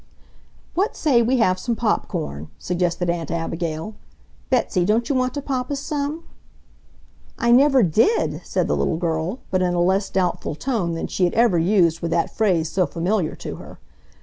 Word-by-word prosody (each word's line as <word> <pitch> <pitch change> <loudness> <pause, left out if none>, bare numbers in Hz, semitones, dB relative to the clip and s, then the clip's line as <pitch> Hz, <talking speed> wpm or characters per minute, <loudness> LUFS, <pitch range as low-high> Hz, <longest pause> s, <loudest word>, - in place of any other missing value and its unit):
"What 390 +5 0
say 270 -7 +3
we 250 +3 +2
have 185 -6 +2
some 235 - -2
pop 225 -1 0
corn!" 80 - -5
suggested 175 - -1
Aunt 170 -3 -2
Abigail. 165 +2 -3 0.6
"Betsy, 180 - +1
don't 220 +5 +1
you - - 0
want 255 0 0
to 285 - -4
pop 255 -3 -2
us 285 -1 -2
some?" 295 +2 -3 1.1
"I 235 -2 +2
never 265 0 +5
DID," 220 - +2
said - - -1
the - - +1
little 160 - 0
girl, 165 +6 -2
but 185 0 +1
in 180 -1 +1
a - - +1
less 190 +3 +2
doubtful 180 -4 -1
tone 190 - -2
than 165 - -3
she 185 - 0
had 175 - -1
ever 225 -7 +4
used 170 -2 +2
with 170 - -2
that 170 0 -1
phrase 180 -7 +2
so 180 +2 0
familiar 175 +2 -1
to - - -7
her. - - -12
185 Hz, 180 wpm, -22 LUFS, 170-245 Hz, 1.1 s, never